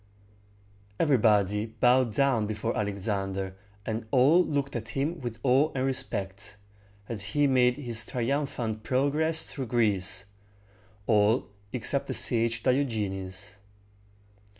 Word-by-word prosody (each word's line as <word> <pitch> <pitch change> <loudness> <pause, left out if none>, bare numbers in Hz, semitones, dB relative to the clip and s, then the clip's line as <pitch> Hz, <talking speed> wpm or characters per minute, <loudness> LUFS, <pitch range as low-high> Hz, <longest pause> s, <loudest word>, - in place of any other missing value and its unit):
Everybody 105 - +3
bowed 125 +1 +2
down 125 -4 +2
before 110 +2 -3
Alexander, 95 -2 -2 0.3
and 110 +1 -4
all 140 +9 +5
looked 140 -4 -2
at 115 -1 -4
him 145 +8 -2
with 120 -3 -5
awe 135 +4 +3
and 130 0 0
respect, 100 -6 -4 0.5
as 115 -4 -5
he 105 +9 0
made 125 -2 +3
his 120 -6 -2
triumphant 120 -3 -2
progress 150 +6 +1
through 135 -3 -6
Greece, 100 -5 0 0.8
all 105 +1 +2 0.2
except 130 +3 -1
the - - -2
sage 115 -1 +2
Di 130 - +4
og´e 110 -7 -2
nes. 95 +1 -8
115 Hz, 120 wpm, -28 LUFS, 105-135 Hz, 0.8 s, all